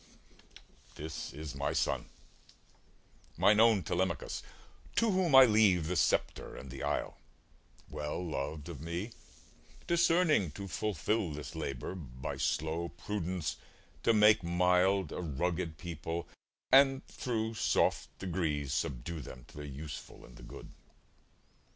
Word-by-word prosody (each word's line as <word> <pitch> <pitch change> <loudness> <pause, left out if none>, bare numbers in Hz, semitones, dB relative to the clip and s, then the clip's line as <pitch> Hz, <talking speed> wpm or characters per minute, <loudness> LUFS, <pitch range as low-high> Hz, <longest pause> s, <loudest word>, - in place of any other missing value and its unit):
This 80 +1 -6
is 75 0 -7
my 70 0 -2
son, - - 0 1.3
mine 105 +1 +5
own 110 -4 +5
Telemachus, 90 -1 -1 0.5
To 230 -2 +3
whom 185 -6 +3
I 135 0 +11
leave 105 -7 +4
the 90 +3 -1
sceptre 80 - +1
and 65 0 -9
the 65 - -7
isle, - - -2 0.7
Well 75 +4 -4
loved 75 0 -4
of 80 -6 -7
me, 85 +7 -4 0.7
discerning 165 - +3
to 100 -1 -6
fulfil 105 +1 -1
This 75 +1 -7
labour, 70 -3 -4
by 65 -8 -6
slow 80 +3 -1
prudence 90 -6 -3 0.4
to - - +4
make 105 -1 +6
mild 90 +1 +2
A - - -4
rugged 85 +1 -2
people, 85 0 -5 0.4
and 135 0 +6
thro' 110 -2 -2
soft 110 - +1
degrees 80 -7 -2
Subdue 80 +1 -2
them 65 -3 -10
to - - -15
the 75 0 -6
useful 70 +2 -8
and - - -15
the - - -13
good. - - -10
85 Hz, 125 wpm, -32 LUFS, 75-105 Hz, 1.3 s, I